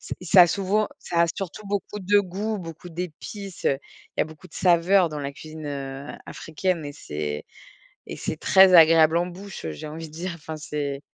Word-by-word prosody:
c'est - - -6
ça 180 +1 +7
a - - +6
souvent 200 +4 0
ça 170 - -1
a 170 - +5
surtout 195 +2 -6
beaucoup 205 +1 -3
de 205 +2 +4
goût, 200 +3 -3
beaucoup 170 -2 -8
d'épices. 180 +3 -7
Il 135 - +2 0.4
y - - +1
a - - -1
beaucoup 155 0 -13
de - - -19
saveurs 180 0 +4
dans 150 - -5
la 140 0 -4
cuisine, 155 +1 -9
heu, 140 0 -5
a - - -11
africaine 170 +2 -2
mais 145 -1 -6
c'est 75 - -5 0.6
et - - -7
c'est - - -4
très 190 -1 +6
agréable 165 -1 +7
en 175 - +1
bouche, 190 - -9
heu, 80 - -2
j'ai 75 - -7
envie 160 +2 -7
de - - -18
dire, 175 +2 -4
enfin, 160 -1 -7
c'est 145 -2 -4
165 Hz, 210 wpm, -25 LUFS, 150-190 Hz, 0.6 s, ça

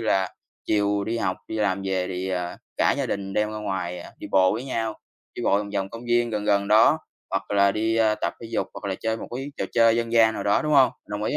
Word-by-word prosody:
là 95 -4 +1 0.3
chiều 100 -1 +1
đi 115 +2 -2
học, 95 -4 -1
đi 110 - -4
làm 100 -2 0
về 95 -1 -1
thì, 95 0 -3
à, 90 -1 -3 0.2
cả - - +3
gia - - -1
đình 95 -1 -3
đem 105 +1 +1
ra 110 - -5
ngoài, 95 -4 -3
à, - - -11
đi - - -7
bộ 95 -1 +4
với 115 +5 -3
nhau, 115 -4 -2 0.4
đi - - -5
bộ 100 - +3
vòng 100 -1 -5
vòng 95 -1 -1
công 115 +1 -9
viên 120 0 +2
gần 105 -2 -2
gần 100 -1 +2
đó, 110 +8 +6 0.3
hoặc 95 0 -2
là 100 -1 +4
đi, 110 +2 0
a, 110 -1 +3
tập 105 - -3
thể 115 - -8
dục - - -1
hoặc 100 - -5
là 95 - -1
chơi 110 0 -1
một - - -8
cái 135 +2 -6
trò - - -2
chơi 115 -1 +5
dân 115 0 -2
gian 110 -1 +5
nào - - -3
đó, 100 - +2
đúng 150 - -1
hông? 130 -3 +6 0.2
Đồng 105 +1 -4
ý - - 0
105 Hz, 270 wpm, -24 LUFS, 95-115 Hz, 0.4 s, đó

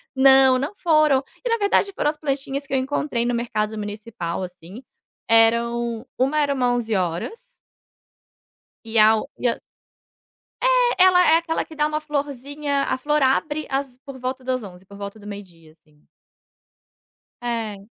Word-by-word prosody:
Não, 265 -1 +6
não 290 +9 -3
foram. 305 -6 +3 0.2
E - - -2
na 460 - +2
verdade 405 -1 +2
foram 295 - 0
as 305 - -3
plantinhas 275 -1 -3
que - - -6
eu - - +3
encontrei 260 -2 -1
no 245 - 0
mercado 220 -2 -2
municipal, 205 -4 -5
assim, 180 +6 -10 0.4
eram 235 +1 +2
uma 270 +4 +1
era 285 -1 +1
uma 250 -2 +1
onze-horas 220 - -2 1.4
e 225 0 -3
a 215 0 +8
o - - -5
e 245 - +1
a - - -3 1.0
É, - - +4
ela 360 -1 +6
é 325 - +7
aquela 330 -1 -2
que 315 - -13
dá 300 0 +1
uma 305 0 -2
florzinha, 285 -1 -3
a - - -1
flor 295 +2 0
abre 295 +3 +1
às 270 -2 -3
por 270 -1 -11
volta 255 +1 -4
das 255 -1 -1
11h, 185 -1 -12
por 200 - -14
volta 200 +1 -7
do 205 - -15
meio 205 0 -6
dia, 165 -4 -20
assim. 155 -2 -29 1.4
É. 225 -4 -3
255 Hz, 165 wpm, -22 LUFS, 220-295 Hz, 1.4 s, a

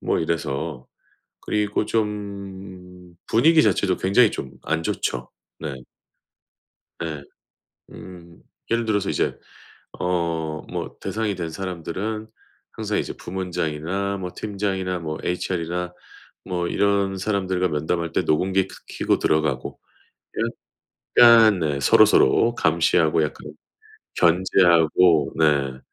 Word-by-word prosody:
뭐 - - 0
이래서 80 -4 -3 0.5
그리고 105 0 -1
좀 95 -4 -5
분위기 155 +7 +5
자체도 95 -3 +2
굉장히 100 +4 +4
좀 65 - -5
안 80 0 -1
좋죠. 65 -5 -3 0.3
네. 75 -4 -5 1.2
네. 80 -3 -4 0.7
음. 85 -2 -12 0.3
예를 115 0 +1
들어서 100 -3 0
이제 - - -1 0.6
어 85 -2 -1 0.3
뭐 - - -5
대상이 110 -2 -2
된 85 -3 -4
사람들은 95 +5 -5 0.4
항상 - - -3
이제 - - -3
부문장이나 90 +1 -3
뭐 90 -2 -5
팀장이나 95 -3 -2
뭐 80 -1 -4
HR이나 90 0 -2 0.5
뭐 90 -1 -2
이런 100 0 +1
사람들과 95 -2 0
면담할 80 +2 -2
때 - - +2
녹음기 95 +4 +1
크 - - -12 0.2
켜고 - - +1
들어가고 75 -4 0 1.4
약간 115 -5 +8
네 75 -3 -1
서로서로 90 - +5
감시하고 80 -2 +2
약간 75 - -6 0.6
견제하고 85 -3 +4
네. 70 -5 +2
90 Hz, 230 characters per minute, -23 LUFS, 80-100 Hz, 1.4 s, 약간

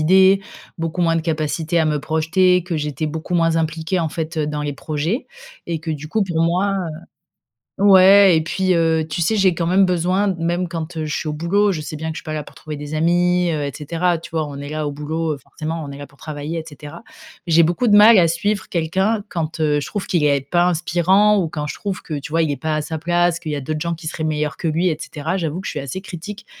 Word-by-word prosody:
idées, 190 +4 +5 0.4
beaucoup 165 +1 -3
moins 165 -1 +3
de 165 - +1
capacité 160 +1 -1
à 160 - +3
me 150 -1 0
projeter, 165 +4 +2
que 175 -3 -3
j'étais 150 0 -2
beaucoup 160 +3 -4
moins 165 -1 +2
impliquée, 160 +2 -1
en 165 - 0
fait, 160 +2 -5
heu, 155 -1 0
dans 150 0 -3
les 145 - -2
projets 155 - -3 0.4
et 165 -2 -1
que 160 0 -4
du 155 0 -6
coup, 215 +5 +1
pour 170 -4 -2
moi, 180 +4 +1
heu 170 -4 -5 0.7
ouais 195 -2 +7
et - - +1
puis 185 +2 0
heu, 160 -1 +2
tu 150 - -2
sais, 215 +7 +1
j'ai 190 -3 +3
quand 170 - -1
même 185 +3 +4
besoin 180 +3 +1
même 175 +2 -1
quand 165 -1 -5
heu, 155 - -2
je 150 - -3
suis - - -4
au - - -2
boulot, 195 +7 +2
je 160 -5 -3
sais 155 - -6
bien 160 +1 -4
que - - -8
je - - -4
suis - - -16
pas 155 - -5
là 155 -1 -3
pour - - -15
trouver 155 -1 -7
des 145 +1 -7
amis 175 +2 +2
heu 150 -2 -1
et 140 - -3
cetera, 170 +3 -1
tu 165 - -11
vois, 160 -2 -1
on 140 -1 -8
est 145 - -7
là 155 0 -3
au 145 - -2
boulot, 155 +2 -3
heu, 145 - -6
forcément, 160 +4 -6
on 145 - -7
est 140 - -8
là 145 - -8
pour 140 0 -23
travailler, 155 +2 -5
et - - -6
cetera, 150 +2 -10 0.5
j'ai 165 0 +5
beaucoup 175 +9 +1
de 205 - +5
mal 215 0 +8
à 170 - +5
suivre 195 +5 -1
quelqu'un 190 +6 0
quand 160 -1 -4
heu, 150 -1 +2
je 145 - -5
trouve 205 -2 -4
qu'il 170 -4 0
est 140 -1 +3
pas 175 0 +4
inspirant 180 +4 +3
ou 175 - 0
quand 150 -1 -4
je 150 - -4
trouve 200 -3 -4
que, 160 - -7
tu 150 +2 -9
vois, 165 0 +2
il 155 - 0
est 140 - -3
pas 155 -1 0
à 155 - 0
sa 160 +1 -5
place, 175 +1 +1
qu'il 155 - -5
y - - -1
a 145 - -4
d'autres 155 +3 -3
gens 170 +1 -2
qui 165 - -13
seraient 155 0 -3
meilleurs 150 -1 -1
que 170 - -3
lui, 165 +4 +1
et 155 - -2
cetera. 165 +4 -3
J'avoue 165 0 -3
que - - -12
je - - -2
suis - - -4
assez 140 +7 -5
critique- 195 +4 -8
165 Hz, 270 wpm, -20 LUFS, 155-180 Hz, 0.7 s, mal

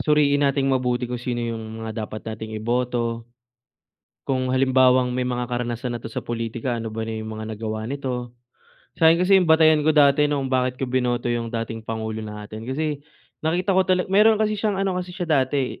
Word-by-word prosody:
suriin 145 -1 +3
nating 140 -1 +2
mabuti 125 -1 0
kung 125 0 -4
sino 120 0 -3
yung 110 -1 -5
mga 110 0 -4
dapat 110 - -8
nating 110 0 -5
iboto. 120 0 -1 0.9
Kung 130 -1 -1
halimbawang 130 -1 +4
may 125 0 -1
mga 125 0 -2
karanasan 120 0 -3
na - - -14
'to - - -7
sa - - -3
pulitika, 115 +1 -3
ano 115 - -4
ba 115 - -3
na 110 0 -4
yung 110 0 -6
mga 110 0 -6
nagawa 110 0 -4
nito? 125 -3 -4 0.7
Sa'kin 165 +1 +6
kasi 190 +1 +5
yung 175 - 0
batayan 160 -1 +6
ko 155 - +3
dati 145 0 +5
nung 140 -2 -1
bakit 130 0 +1
ko 135 - -1
binoto 125 -1 0
yung 115 -1 -2
dating 115 -1 -4
pangulo 110 0 -4
natin 105 +1 -8
kasi 150 +1 -2 0.4
nakita 175 +5 +1
ko 190 - +5
tala 185 -1 +3
meron 210 +3 +5
kasi 215 0 +1
siyang 210 -1 -1
ano 195 -1 0
kasi 180 0 -4
siya 180 - -3 0.2
dati, 130 0 -2
125 Hz, 195 wpm, -23 LUFS, 115-150 Hz, 0.9 s, Sa'kin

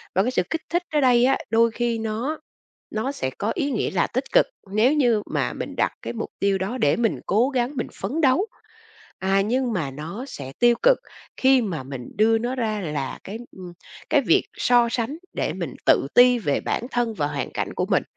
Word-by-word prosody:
Và 190 - +4
cái 250 - 0
sự 180 - +2
kích 325 - -2
thích 345 +1 0
ở 300 - +3
đây 245 -2 +5
á, 270 +1 +3
đôi 230 +1 +4
khi 235 0 -1
nó 225 +8 -2 0.5
nó 240 +6 -2
sẽ 130 - -3
có 215 - 0
ý 285 -4 -1
nghĩa 235 - -1
là 180 -2 +1
tích 255 +2 -2
cực, - - +5 0.3
nếu 220 +6 +4
như 240 -8 +3
mà - - 0
mình - - -6
đặt - - +1
cái - - -4
mục 230 - -5
tiêu 200 -1 +1
đó 200 +7 -3
để 145 - +3
mình 230 -1 0
cố 230 +6 +3
gắng, 260 +1 -1
mình 240 - -1
phấn 310 +5 -2
đấu, 300 +7 +3 0.7
à, 195 +1 +2
nhưng 245 +4 0
mà 160 -9 -2
nó 160 - -6
sẽ 135 - -8
tiêu 240 0 +5
cực - - +5 0.4
khi 265 -1 +4
mà 170 -9 -3
mình 130 -2 -7
đưa 225 +2 +4
nó 240 +3 -2
ra 220 -4 -1
là 150 -6 -3
cái, 205 +4 -6 0.2
ưm, 180 -2 -9 0.4
cái - - +5
việc - - +3
so 240 -1 +3
sánh 240 +5 -2 0.2
để - - -1
mình - - -5
tự - - +4
ti 245 0 +7
về 150 -11 0
bản 240 - -2
thân 240 -2 0
và 150 -7 -1
hoàn 145 -2 -3
cảnh - - -3
của - - -1
mình. - - +2
230 Hz, 220 wpm, -23 LUFS, 195-255 Hz, 0.7 s, ti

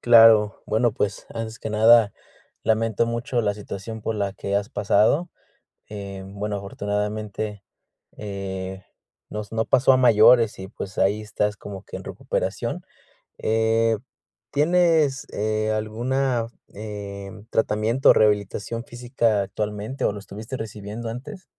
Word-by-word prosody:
Claro, 115 -3 +6
bueno, 110 +1 +2
pues, 105 -5 -2
antes 115 0 -5
que - - -5
nada, 110 0 +6 0.5
lamento 115 +1 +1
mucho 115 +1 -1
la 105 -1 +1
situación 105 +2 -7
por 115 - -2
la 100 -2 -1
que 100 -1 -4
has 100 +2 -1
pasado. 110 - +2 0.6
Eh, 100 -2 -7
bueno, 100 +1 -4
afortunadamente, 105 +1 -3 0.5
eh, 95 -2 -5 0.4
nos 105 0 -6
no 110 0 0
pasó 130 +1 +4
a - - +5
mayores 115 -2 +6
y, 95 0 -7
pues, 95 +1 -8
ahí 105 +2 +2
estás 105 -1 -1
como 100 -1 -8
que - - -8
en - - -9
recuperación. - - -3 0.6
Eh, 110 0 +2 0.5
¿tienes, 155 -2 +3
eh, 110 +1 0
alguna, 120 +3 0 0.3
em, 100 -1 -7
tratamiento, 110 +4 +3
o, - - +10
rehabilitación 105 +2 +1
física 120 -4 0
actualmente, 105 +6 -4
o, - - +2
lo 105 - -7
estuviste 110 +6 -7
recibiendo 110 +1 -6
antes? 140 - -8
110 Hz, 130 wpm, -24 LUFS, 105-115 Hz, 0.6 s, o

